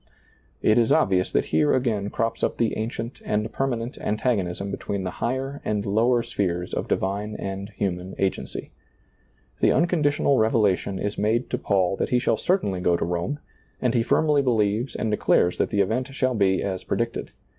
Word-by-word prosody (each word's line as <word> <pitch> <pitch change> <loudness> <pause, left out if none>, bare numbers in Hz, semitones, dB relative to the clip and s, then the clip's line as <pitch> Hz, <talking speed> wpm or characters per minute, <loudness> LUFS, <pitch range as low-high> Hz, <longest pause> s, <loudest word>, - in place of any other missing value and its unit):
It 110 +2 +5
is 115 - +2
obvious 95 -1 +3
that - - +1
here 80 -1 +4
c^ain 105 -5 -1
crops 115 0 -1
up - - 0
the 115 - +1
ancient 115 +2 -4
and 105 +1 -1
permanent 125 -2 -2
antagonism 100 -4 -1
between 100 0 -3
the 90 - -3
higher 135 +3 -2
and 105 -1 -1
lower 115 +4 +2
spheres 90 -5 -2
of - - -2
divine 100 +3 -1
and 95 +1 -5
human 95 -3 -3
agency. 95 -1 -2 0.9
The - - +4
unconditional 150 -5 +2
revelation 105 -4 +2
is 105 +1 -3
made 110 +4 +1
to - - -1
Paul 95 -2 +1
that - - -1
he 125 - +3
shall 125 - +1
certainly 140 - 0
go 90 -1 +3
to - - -1
Rome, 90 - -2 0.4
and 125 -2 +1
he 120 - +3
firmly 150 +4 +3
believes 115 -1 +1
and 110 - -1
declares 90 -4 +2
that - - +1
the 100 -2 +2
event 115 +7 0
shall 130 -1 +1
be 95 -4 +2
as 95 -2 -3
predicted. - - -2
105 Hz, 175 wpm, -24 LUFS, 95-125 Hz, 0.9 s, It